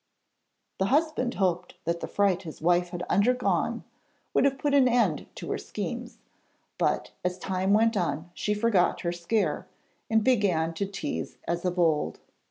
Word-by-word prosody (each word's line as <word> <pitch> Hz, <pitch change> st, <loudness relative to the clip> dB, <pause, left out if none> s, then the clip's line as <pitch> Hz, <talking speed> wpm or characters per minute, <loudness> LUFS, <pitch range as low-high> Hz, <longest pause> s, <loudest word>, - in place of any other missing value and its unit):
The 190 Hz, -, +2 dB
husband 285 Hz, -2 st, +1 dB
hoped 180 Hz, -2 st, 0 dB
that 170 Hz, +1 st, 0 dB
the -, -, -4 dB
fright 195 Hz, -3 st, +2 dB
his 160 Hz, -4 st, -9 dB
wife 175 Hz, +2 st, +2 dB
had 175 Hz, 0 st, -5 dB
undergone 245 Hz, +7 st, +1 dB, 0.5 s
would -, -, +4 dB
have 275 Hz, -1 st, +2 dB
put 285 Hz, +1 st, 0 dB
an 275 Hz, -2 st, +6 dB
end 230 Hz, -, +2 dB
to -, -, -6 dB
her -, -, -1 dB
schemes, -, -, -5 dB, 0.6 s
but -, -, 0 dB
as 180 Hz, 0 st, -1 dB
time 190 Hz, +1 st, -1 dB
went 225 Hz, +2 st, +4 dB
on 170 Hz, -2 st, -2 dB
she 210 Hz, +4 st, -1 dB
forgot 210 Hz, -4 st, +2 dB
her 170 Hz, -, -1 dB
scare, 175 Hz, -1 st, -1 dB, 0.4 s
and 220 Hz, -1 st, +3 dB
began 190 Hz, -10 st, +2 dB
to 195 Hz, +4 st, -2 dB
tease 200 Hz, +9 st, -4 dB
as 170 Hz, +1 st, -1 dB
of 180 Hz, 0 st, -1 dB
old. 160 Hz, -4 st, +1 dB
190 Hz, 165 wpm, -27 LUFS, 175-230 Hz, 0.6 s, an